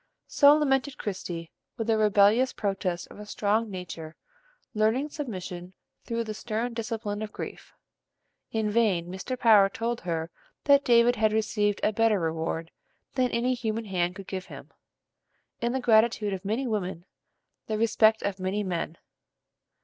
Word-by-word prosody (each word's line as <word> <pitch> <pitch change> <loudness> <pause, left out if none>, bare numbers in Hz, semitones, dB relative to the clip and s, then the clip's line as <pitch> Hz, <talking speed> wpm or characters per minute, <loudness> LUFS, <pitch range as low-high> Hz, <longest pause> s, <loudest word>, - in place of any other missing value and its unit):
So 285 0 +6
lamented 275 -2 +1
Christie 175 -4 -5 0.3
with 225 - -2
the 225 0 +2
rebellious 215 +4 +4
protest 190 -4 -2
of - - -12
a 210 - -8
strong 215 +2 0
nature 165 -4 -7 0.6
learning 220 +7 +1
submission 185 - -6 0.3
through 230 0 -2
the 215 -1 -5
stern 230 +2 -3
discipline 220 -2 -4
of 215 -1 -5
grief. - - -8 0.8
In 220 -2 0
vain 205 -7 +2
Mr. 190 +8 -5
Power 210 -5 +6
told 230 +3 -3
her 165 -1 -3 0.3
that 280 -1 +5
David 240 0 +4
had 215 0 +2
received 210 -1 0
a 215 - +2
better 225 -1 +3
reward 165 0 -2 0.4
than 255 -2 +1
any 240 +2 +1
human 225 -2 -3
hand 180 -2 -1
could 195 0 -9
give 190 0 -5
him, - - -11 0.9
in 235 0 0
the 265 - -1
gratitude 220 -3 +3
of 185 - -5
many 220 +7 -1
women, 190 -6 -3 0.6
the 215 - -1
respect 220 0 +3
of 200 -1 -2
many 190 +3 -1
men. 170 -3 -3
215 Hz, 150 wpm, -27 LUFS, 190-230 Hz, 0.9 s, So